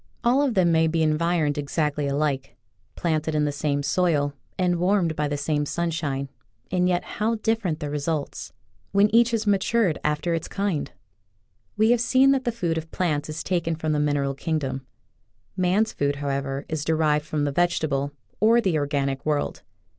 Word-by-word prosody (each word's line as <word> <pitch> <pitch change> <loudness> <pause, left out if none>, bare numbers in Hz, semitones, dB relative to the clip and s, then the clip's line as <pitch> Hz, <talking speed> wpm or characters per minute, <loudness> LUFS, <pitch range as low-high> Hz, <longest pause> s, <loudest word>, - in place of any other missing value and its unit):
All 245 +4 +4
of 270 -5 +1
them 180 -3 +4
may 160 0 +4
be 160 0 +1
environed 155 -1 +1
ex 145 +2 -6
actly 150 -2 +1
alike, 140 -1 -1 0.4
planted 160 -2 -1
in 150 -1 +2
the 145 - 0
same 145 0 -1
soil 145 -4 +1 0.2
and 180 -1 +1
warmed 180 -2 +1
by 150 0 0
the 145 0 -2
same 145 +1 0
sunshine, 150 -4 -2 0.4
and 180 0 +2
yet 175 -1 +1
how 220 +2 -1
different 215 -7 -1
the 150 - -4
results 150 0 -3 0.2
— - - -39
when 200 +1 +4
each 235 +1 +6
has 230 -2 -1
matured 205 -2 +2
after 150 +3 0
its 165 -1 -2
kind! 195 -7 -2 0.9
"We 220 +2 +4
have 240 -1 +3
seen 260 +3 +4
that 270 -1 +1
the 240 - +1
food 175 -8 -1
of 160 0 -10
plants 155 -5 -1
is 155 +1 -4
taken 170 -3 0
from 155 -1 -2
the 150 - +1
mineral 145 -2 +1
kingdom. 135 -3 -3 0.7
Man's 190 +5 +1
food, 140 0 0
however, 140 -1 -3
is 155 -2 -3
derived 155 -1 +1
from 150 -1 -1
the 145 - 0
vegetable 145 -4 0 0.3
or 225 +2 +5
the 185 -9 +1
organic 140 -2 -1
world. 150 -2 -1
160 Hz, 180 wpm, -24 LUFS, 145-185 Hz, 0.9 s, each